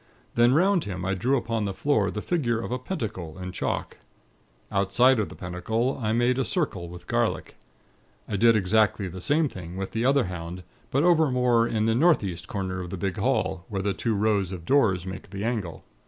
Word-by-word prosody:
Then, 120 +2 +4
'round 185 +2 +3
him, 90 -2 -4
I 95 - 0
drew 120 +9 +1
upon 115 -3 -2
the 100 -1 -3
floor 110 -8 +1
the 105 - -5
figure 120 -10 0
of 115 - -5
a 125 - -1
Pentacle, 105 - -5
in 90 0 -6
chalk. - - -3 0.7
Outside 110 +6 +3
of 105 - -1
the - - -10
Pentacle, 110 +9 -2
I 110 -1 0
made 120 +3 +2
a - - +2
circle 100 - -2
with 90 0 -11
garlic. - - -1 0.7
I 105 - -3
did 115 +3 +5
exactly 105 0 +2
the 90 +1 -7
same 150 - +2
thing 90 -6 -8
with 95 0 -4
the 115 - -1
other 135 +1 +4
hound; 90 0 -6 0.3
but 140 +3 +1
over 165 -4 +4
more 125 -2 +3
in 110 -2 0
the 115 - +2
northeast 105 - +2
corner 95 -2 -3
of 90 - -6
the 95 - -5
big 95 0 -2
hall, 85 - 0
where 95 -2 -3
the 100 0 0
two 115 +1 -1
rows 100 -2 +1
of 85 -3 -7
doors 100 -10 +3
make 95 +1 -7
the 100 +1 -5
angle. 110 -8 -3
105 Hz, 205 wpm, -26 LUFS, 95-125 Hz, 0.7 s, did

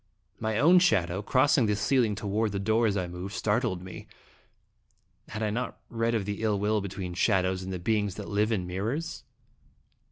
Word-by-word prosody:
My 110 -1 -1
own 170 +8 +6
shadow, 95 - +2
crossing 130 +2 +3
the 105 - +1
ceiling 110 0 +2
toward 105 +1 -1
the 100 - -1
door 110 +3 +2
as 100 -1 0
I 90 - -1
moved, 90 +3 -7
startled 105 -4 0
me. 90 -2 -9 1.2
Had 110 +1 -5
I 105 - 0
not 125 +4 -3
read 115 0 0
of 105 -4 -1
the 105 +1 -4
ill 110 -2 +1
will 105 +1 +1
between 95 -2 -5
shadows 95 0 +1
and 95 0 -6
the 95 - -3
beings 105 +1 0
that 105 - -7
live 105 +2 +1
in 95 -5 0
mirrors? 110 - -3
105 Hz, 185 wpm, -28 LUFS, 95-115 Hz, 1.2 s, own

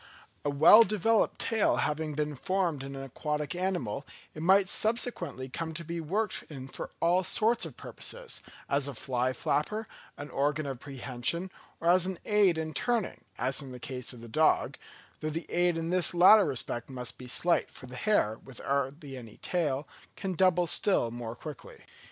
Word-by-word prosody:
A 145 - 0
well 155 +10 +8
developed 220 0 +2
tail 220 -2 +2
having 150 0 -1
been 150 0 -1
formed 180 -1 -1
in 135 0 -7
an 135 - -6
aquatic 150 +3 -3
animal, 175 - -2 0.3
it 155 - -7
might 190 +3 +5
subsequently 220 - -1
come 160 +5 -5
to 170 - -5
be 170 +1 -4
worked 200 +7 -1
in 135 -4 -8
for - - -7
all 175 +3 +3
sorts 225 +6 +3
of - - -13
purposes, - - -5 0.3
as 140 0 +1
a 140 - -5
fly 125 +1 -1
flapper, 210 - -1 0.3
an 145 +1 -7
organ 145 +2 0
of 135 -3 -4
prehension, 135 +6 -3 0.3
or 165 - -3
as 180 +1 +5
an 190 -2 -3
aid 205 -5 +4
in 160 -1 -3
turning, 235 -1 -1
as 130 +4 0
in 135 -2 -9
the 125 - -8
case 125 0 -4
of 120 -3 -10
the 115 - -9
dog, 155 +7 +2 0.4
though 155 - -2
the 165 +2 -4
aid 175 -1 +2
in 165 +1 -2
this 180 0 +2
latter 190 +4 +8
respect 120 -3 -3
must 125 -2 -5
be 125 - -9
slight, 170 +7 +1
for - - -12
the 125 0 -10
hare, 125 - +1
with 135 -3 -12
hardly 140 +1 -2
any 115 -4 -10
tail, 150 -5 -1 0.3
can 190 -2 -3
double 180 0 +3
still 165 - +2
more 120 -1 -6
quickly. 150 +1 -10
155 Hz, 180 wpm, -30 LUFS, 135-185 Hz, 0.4 s, well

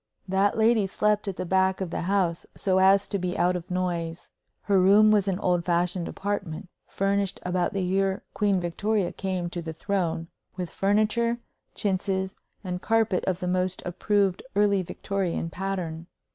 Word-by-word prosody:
That 195 +3 +2
lady 220 -2 +4
slept 210 +2 +1
at 195 - -2
the 185 - -3
back 190 +1 +2
of 185 -3 -3
the - - -2
house, 180 -2 0
so 190 -1 +1
as 195 +1 +5
to 200 - -2
be 180 0 -2
out 180 +1 +2
of 180 0 -5
noise. 175 -2 -3 0.3
Her 200 -2 +3
room 205 +3 +6
was 205 -2 +3
an 190 -2 +1
old 180 -3 +1
fashioned 175 0 0
apartment, 190 -5 -4 0.2
furnished 195 -1 0
about 180 -1 0
the 195 -1 -1
year 195 +1 0
Queen 200 -2 +2
Victoria 185 +3 0
came 185 -2 -3
to 175 - -4
the 160 -1 -6
throne, 170 -2 -2 0.3
with 180 -2 -4
furniture, 215 +4 +1 0.4
chintzes, 190 -1 -1 0.3
and 180 -1 -4
carpet 225 -4 +2
of 185 -1 -1
the 180 - -2
most 185 0 0
approved 195 +1 +1
early 200 -1 +3
Victorian 180 -2 -3
pattern. 175 -4 -4
190 Hz, 165 wpm, -26 LUFS, 180-200 Hz, 0.4 s, room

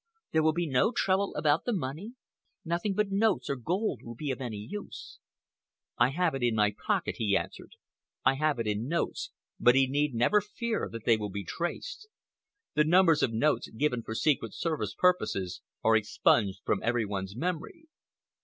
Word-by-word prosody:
There 160 - +3
will 160 0 +4
be 175 +1 -1
no 150 - +2
trouble 195 -3 +1
about 150 0 +2
the 245 - 0
money? 180 - -4 0.5
Nothing 175 +4 -1
but 210 -1 0
notes 200 -5 +1
or - - 0
gold 180 - -2
will 115 0 -9
be 145 +3 -3
of 130 - -5
any 120 -5 -4
use." 195 - -8 0.8
"I 120 +1 +4
have 170 +4 0
it 135 - -3
in 120 -2 +2
my 105 -1 +3
pocket," - - -1
he 100 -3 +2
answered. - - -7 0.5
"I 130 - +5
have 150 +1 0
it 115 - -2
in 105 +3 -1
notes, 170 +3 -2 0.3
but 120 - +5
he 135 0 +5
need 145 0 0
never 165 - +3
fear 225 +2 -3
that 115 -1 -8
they 115 -2 +5
will 105 -1 -4
be 100 +1 -5
traced. 425 - -5 0.7
The 150 0 +4
numbers 165 -1 +5
of 115 - +2
notes 130 +7 +1
given 125 0 -1
for 110 0 -6
Secret 120 -6 +1
Service 150 - -2
purposes 100 - +1 0.2
are 110 0 +5
expunged 105 -2 +2
from 100 - +1
every 115 -1 +1
one's 100 -1 -4
memory." 180 - -4
145 Hz, 180 wpm, -29 LUFS, 115-180 Hz, 0.8 s, I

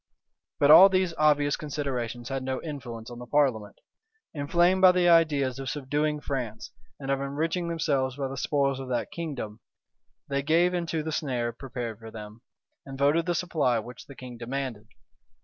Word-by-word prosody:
But 145 +1 +6
all 180 +5 +10
these 185 -2 +1
obvious 145 -1 +3
considerations 130 -5 -4
had 135 -1 -2
no 130 0 -3
influence 125 -7 -7
on 120 - -9
the 125 - -9
parliament. 120 -8 +1 0.6
Inflamed 175 +5 +2
by 185 -1 +8
the 180 -1 +2
ideas 145 -6 +3
of 135 -1 -4
subduing 150 +1 -1
France, 120 -7 -4 0.3
and 135 -1 -3
of 135 0 0
enriching 160 +5 -2
themselves 140 -6 0
by 140 -1 -2
the 135 - -6
spoils 140 0 0
of 135 -1 -7
that 125 -2 -2
kingdom, 135 -10 -5 0.7
they 140 0 -1
gave 165 +5 +2
into 165 -3 -2
the 160 - -4
snare 125 -6 -2
prepared 120 -3 -6
for 115 0 -10
them, 110 0 -10 0.4
and 135 -1 -9
voted 150 +5 +2
the 175 - +1
supply 150 -9 +1
which 120 +3 -8
the 140 - -11
king 125 -2 -10
demanded. 120 -3 -4
140 Hz, 170 wpm, -27 LUFS, 125-155 Hz, 0.7 s, all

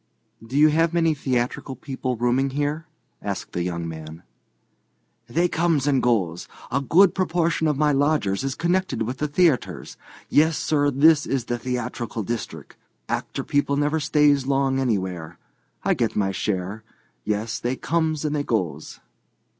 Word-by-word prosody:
"Do 120 +5 -4
you 155 +1 +7
have 165 +2 +2
many 165 -2 +3
theatrical 130 -1 -2
people 130 -2 -4
rooming 125 +3 +1
here?" 145 +4 -2 0.3
asked 100 -2 -4
the 90 - -2
young 85 -1 -3
man. 80 0 -8 1.0
"They 170 +9 +1
comes 165 -5 +1
and 140 -3 +2
goes. 95 -9 0 0.2
A 140 - +1
good 175 +7 +5
proportion 170 -3 +1
of 150 -3 +1
my 150 0 +3
lodgers 140 -8 +1
is 135 0 -2
connected 175 -7 0
with 125 +4 -4
the 150 - 0
theatres. 150 -2 0 0.3
Yes, 160 +1 +3
sir, 145 -2 +1
this 150 +3 +4
is 135 -3 -1
the 120 0 -2
theatrical 125 -2 -3
district. 115 +2 -6 0.3
Actor - - -3
people 145 0 0
never 150 +2 +1
stays 145 -2 +3
long 135 -1 +1
anywhere. 95 -9 -2 0.5
I - - +3
get - - -1
my 95 -2 +1
share. 95 +2 -3 0.4
Yes, 110 +2 -2
they 125 +2 -1
comes 160 0 -1
and 150 0 0
they 145 - 0
goes." 90 - -3
135 Hz, 155 wpm, -23 LUFS, 115-150 Hz, 1.0 s, you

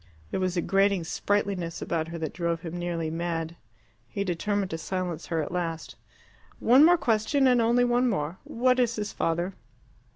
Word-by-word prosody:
There - - -1
was 185 -1 -1
a 170 - +1
grating 195 -2 +2
sprightliness 180 0 -1
about 165 -1 -2
her 170 +1 -6
that 160 -2 -4
drove 170 -1 -2
him 165 0 -6
nearly 170 -2 -2
mad. 165 0 -3 0.5
He 200 - -2
determined 200 +2 -1
to 160 - -3
silence 180 -2 -3
her 165 -2 0
at - - -6
last. 165 -2 -3 0.6
"One 255 +5 +6
more 350 +2 +7
question, 270 +1 +2
and 250 -2 +5
only 240 +2 +3
one 245 +1 +2
more. 165 -4 -2
What 255 +2 +1
is 235 -2 +2
his 210 0 -4
father?" 170 +3 -1
180 Hz, 175 wpm, -27 LUFS, 165-225 Hz, 0.6 s, more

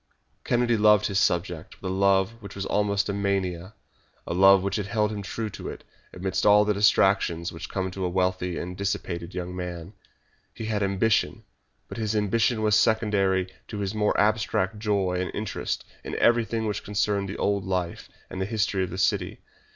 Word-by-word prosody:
Kennedy 120 -1 +2
loved 105 0 +5
his 100 -1 +1
subject 85 -3 -1
with 95 - -4
a - - -1
love 100 +3 +2
which 100 -2 -10
was 100 -1 -4
almost 100 0 +1
a 100 - -2
mania 95 -1 -2 0.5
a - - -3
love 95 +1 +6
which 100 +1 -1
held 105 +1 0
him 105 -1 -4
true 110 +3 -4
to - - -7
it, - - -9 0.3
amidst 95 +1 -2
all 105 0 +6
the 105 - +2
distractions 95 -4 +2
which 80 - -7
come 95 -1 -2
to 95 0 -5
a 90 - 0
wealthy 90 -1 -1
and 90 +1 -5
dissipated 90 -3 -3
young 90 0 -4
man. 90 0 -6 0.6
He 115 - -6
had 110 -1 -1
ambition, 100 +2 +1 0.4
but - - -7
his 110 -1 -1
ambition 110 +2 +1
was 105 -1 +4
secondary 100 -5 +2
to 105 - -6
his 100 0 -2
mere 105 -1 +1
abstract 105 -1 +1
joy 100 -4 0
and 90 - -2
interest 105 0 -3 0.2
in - - -5
everything 115 -1 +2
which 105 -1 -3
concerned 100 -1 -1
the 100 - -5
old 100 -1 0
life 90 -2 -3 0.2
and 95 - -6
history 100 -1 0
of 90 - -3
the 90 - -6
city. 95 - 0
100 Hz, 180 wpm, -26 LUFS, 95-105 Hz, 0.6 s, love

